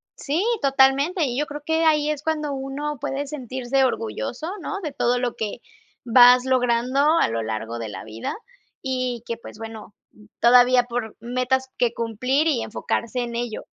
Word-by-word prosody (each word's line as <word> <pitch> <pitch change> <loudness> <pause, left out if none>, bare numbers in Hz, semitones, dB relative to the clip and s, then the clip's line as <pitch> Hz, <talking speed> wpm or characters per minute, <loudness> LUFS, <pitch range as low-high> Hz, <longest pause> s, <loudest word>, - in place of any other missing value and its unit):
Sí, 305 +6 -1 0.2
totalmente, 275 +5 +3
y 250 -1 -3
yo 295 - +1
creo 295 -1 -7
que 320 +1 +1
ahí 305 -2 +3
es 300 -2 -2
cuando 305 -2 -2
uno 275 +2 -4
puede 275 +4 -3
sentirse 260 -1 -1
orgulloso, 245 +3 -2
¿no?, 395 - -4
de 305 - -3
todo 245 -2 +1
lo 245 -1 -2
que, 215 -2 -4 0.4
vas 245 +1 +7
logrando 250 0 +1 0.2
a - - +3
lo 115 0 -2
largo 110 +1 -4
de 115 -1 -5
la 105 - -7
vida 110 +1 -5 0.5
y 255 -3 -2
que, 230 - -3
pues, 225 - -12
bueno, 225 -2 -9 0.5
todavía 245 +1 +6
por 235 -2 -4
metas 255 +3 -1
que 240 -1 +1
cumplir 250 +7 0
y 270 -8 +1
enfocarse 235 +2 -3
en 240 -1 -3
ello. 235 -2 -4
250 Hz, 170 wpm, -23 LUFS, 235-280 Hz, 0.5 s, vas